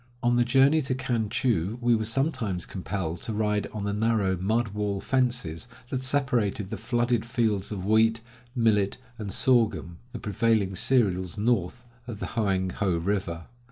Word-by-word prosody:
On 120 0 +3
the 120 - +4
journey 135 +5 +4
to 130 -2 -2
Kan 120 -4 -1
chou 115 -6 0
we 120 0 +3
were 110 -1 -1
sometimes 115 - -1
compelled 90 -3 -4
to 115 - -3
ride 105 -1 0
on 105 -2 -5
the 100 0 -1
narrow 105 -3 +1
mud 110 +5 0
wall 100 -1 -2
fences 125 -9 0 0.2
that 130 - -2
separated 125 -8 0
the - - -3
flooded 120 -1 0
fields 115 -5 -1
of 95 -3 -4
wheat, 110 +2 +3 0.4
millet, 105 -5 +2 0.2
and 105 -3 -4
sorghum, 110 -9 +1
the 125 - -6
prevailing 105 -2 0
cereals 95 -6 +2
north 110 +1 0 0.2
of 115 -4 -6
the - - -4
Hoang 95 -5 0
ho 95 -4 0
river. 85 -2 -2
110 Hz, 160 wpm, -27 LUFS, 95-120 Hz, 0.4 s, the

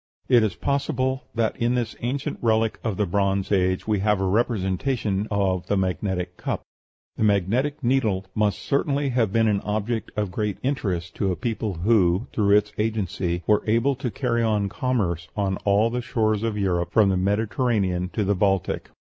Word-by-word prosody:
It 125 -2 +5
is 105 -5 0
possible 130 -1 -1
that 115 -1 +1
in 120 +1 +1
this 120 -3 -2
ancient 130 +3 -3
relic 110 -1 +1
of 110 -4 -2
the 105 - +1
Bronze 100 +1 0
Age 95 -1 +1
we 105 -2 +1
have 105 0 +2
a 95 - 0
representation 105 0 0
of 95 -3 0
the 100 - +1
magnetic 90 -1 -2
cup. - - -3 0.5
The - - 0
magnetic 110 +9 +1
needle 115 -7 +1
must 105 -3 0
certainly 140 0 0
have 120 -5 +1
been 115 +1 +3
an 105 -2 +1
object 110 +2 -2
of 105 -3 -1
great 105 +1 -2
interest 95 - -2
to 95 -2 +1
a - - -1
people 110 -3 -3
who, 95 +2 +2
through 100 -1 +4
its 105 0 0
agency, 95 -5 -1
were 105 -1 +3
able 115 +6 +3
to 130 -2 -2
carry 120 0 -1
on 105 -3 +1
commerce 95 -9 -1
on 95 -2 0
all 105 +3 +3
the 125 +1 -2
shores 110 -3 0
of 115 -2 -1
Europe, 90 -4 0
from 105 -3 +4
the 95 - +2
Mediterranean 100 -2 0
to 110 - 0
the 100 +1 +2
Baltic. 95 -1 0
105 Hz, 180 wpm, -24 LUFS, 95-115 Hz, 0.5 s, It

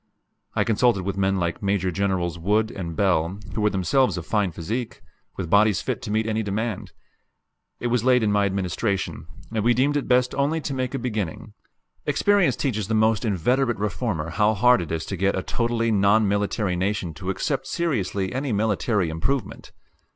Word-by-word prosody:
I - - +3
consulted 115 -3 +2
with 100 +1 -2
men 95 0 +1
like 85 -2 -2
Major 100 -2 0
Generals 90 -2 -1
Wood 105 +5 +1
and 85 -6 -5
Bell, 90 -2 +1 0.2
who 105 - -2
were 105 - +3
themselves 100 +2 +1
of 85 - -5
fine 105 -3 0
physique, 110 +9 -5 0.3
with 95 - -3
bodies 100 +2 +3
fit 125 -4 -3
to - - -6
meet 110 +1 +1
any 110 0 0
demand. 110 +1 -3 0.9
It - - -6
was 120 -3 +1
late 125 -2 +4
in 105 - +2
my 100 -1 +3
administration; 95 +1 -2 0.3
and 110 -2 0
we 120 +1 +3
deemed 140 +4 +2
it 145 - -1
best 125 0 +3
only 145 +4 0
to 145 - -4
make 130 0 -2
a - - 0
beginning 110 -9 -4 0.5
experience 205 -3 +3
teaches 110 -8 -2
the 110 - 0
most 110 0 +2
inveterate 120 +5 +1
reformer 90 -4 -2
how 105 +5 +2
hard 125 0 +4
it 85 - -6
is 80 -1 -2
to 100 - -4
get 95 +2 +1
a 95 - -2
totally 115 -1 0
non 105 +1 +4
military 100 -1 0
nation 95 -2 -1
to 90 +4 -6
accept 135 +7 -2
seriously 100 - -1
any 130 +1 -2
military 105 -3 +1
improvement. 105 +8 -3
105 Hz, 185 wpm, -24 LUFS, 95-120 Hz, 0.9 s, late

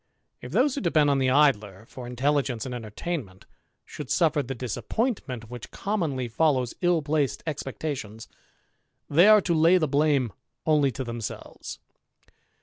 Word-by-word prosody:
If 125 - -8
those 255 - +3
who 280 - -3
depend 155 -5 +3
on 140 - +2
the 130 -1 +2
Idler 110 -8 +2
for 125 0 -9
intelligence 125 -1 0
and 130 - -5
entertainment 115 - -5 0.4
should 145 - -8
suffer 160 -4 +2
the 135 0 -5
disappointment 125 - -3
which 125 -2 -8
commonly 160 - -2
follows 130 -1 +1
ill 175 -3 +2
placed 145 -8 0
expectations, 135 -7 -5 0.8
they 170 +7 +6
are 215 -1 +8
to 175 - 0
lay 165 +3 +5
the 160 -3 +1
blame 140 -5 +2 0.3
only 150 -3 +3
to 130 - -4
themselves. 115 -3 -7
140 Hz, 145 wpm, -26 LUFS, 120-160 Hz, 0.8 s, are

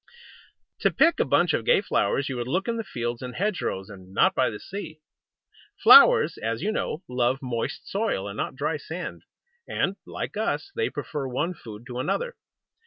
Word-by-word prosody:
To - - +3
pick 330 +2 +3
a - - +3
bunch - - +3
of - - 0
gay - - +4
flowers 140 - 0
you 135 - -3
would 120 0 -3
look 185 +8 -1
in 230 0 -1
the 225 - -2
fields 120 - -4
and 125 -1 -6
hedge 205 0 -1
rows, 95 0 -3
and 95 -3 -12
not - - +4
by 130 - +2
the 105 - -7
sea. 165 -6 -7 0.8
Flowers, - - +7
as 115 +1 -2
you 215 - +1
know, 185 -5 -3
love 125 +1 +1
moist 120 -3 -3
soil, 200 - -1
and 100 - -6
not 130 - -3
dry 150 +3 -1
sand; 160 +5 -6 0.5
and, - - -1
like - - -5
us, 395 - -2
they 455 -1 0
prefer 145 -3 -4
one 150 +8 -1
food 110 -7 -11
to 125 -1 -6
another. 485 - -1
135 Hz, 190 wpm, -26 LUFS, 120-195 Hz, 0.8 s, Flowers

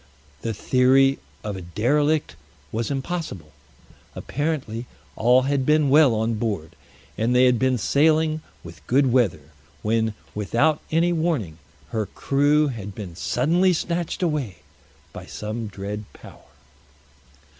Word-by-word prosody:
The 115 -2 -3
theory 135 +4 +3 0.2
of 105 -2 -4
a 95 - -6
derelict 145 - 0 0.4
was 115 +1 -2
impossible. 135 - -4 0.6
Apparently 135 -6 -3 0.3
all 125 +3 +4
had 140 0 0
been 150 0 +3
well 145 -5 +6
on 110 +1 0
board, 100 -9 -2 0.5
and 115 +3 +1
they 125 +1 +6
had 125 -2 +3
been 130 -1 +2
sailing 155 +5 +2 0.2
with 85 -1 -12
good 135 0 +3
weather, 95 - +1 0.3
when, 110 0 0 0.2
without 120 +9 +1
any 170 +2 +2
warning, 155 - -1 0.3
her 110 +2 -2
crew 145 +2 +2
had 105 -6 -7
been 95 -6 -7
suddenly 170 - +2
snatched 170 +1 -2
away 145 - -2 0.5
by - - -9
some 110 +1 -5
dread 100 +1 -6
power. - - -15
125 Hz, 125 wpm, -23 LUFS, 110-150 Hz, 0.6 s, well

